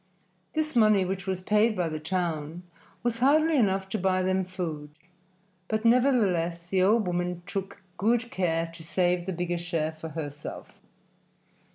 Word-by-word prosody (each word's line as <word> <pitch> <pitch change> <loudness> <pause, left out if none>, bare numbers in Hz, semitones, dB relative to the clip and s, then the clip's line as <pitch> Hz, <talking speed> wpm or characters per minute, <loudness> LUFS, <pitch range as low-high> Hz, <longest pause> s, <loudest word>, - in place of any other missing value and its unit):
This 310 -2 -1
money, 215 -4 +5
which 190 +1 -4
was 190 -1 -1
paid 215 +2 +3
by 180 -3 0
the 155 -1 -4
town, 165 -1 -3 0.4
was 235 -1 -1
hardly 310 +5 +4
enough 195 -6 +2
to 215 - -2
buy 185 0 +1
them 190 0 +1
food, 170 -5 -5 0.8
but 220 +1 -1
nevertheless 200 -10 +3
the 185 +1 +1
old 210 +3 +4
woman 175 0 -2
took 195 0 -5
good 235 +4 +1
care 165 -3 0
to 165 -1 -11
save 175 +1 0
the - - -1
bigger 175 0 -2
share 165 -3 -1
for 160 0 -8
herself. 145 -2 -7
185 Hz, 155 wpm, -27 LUFS, 170-215 Hz, 0.8 s, money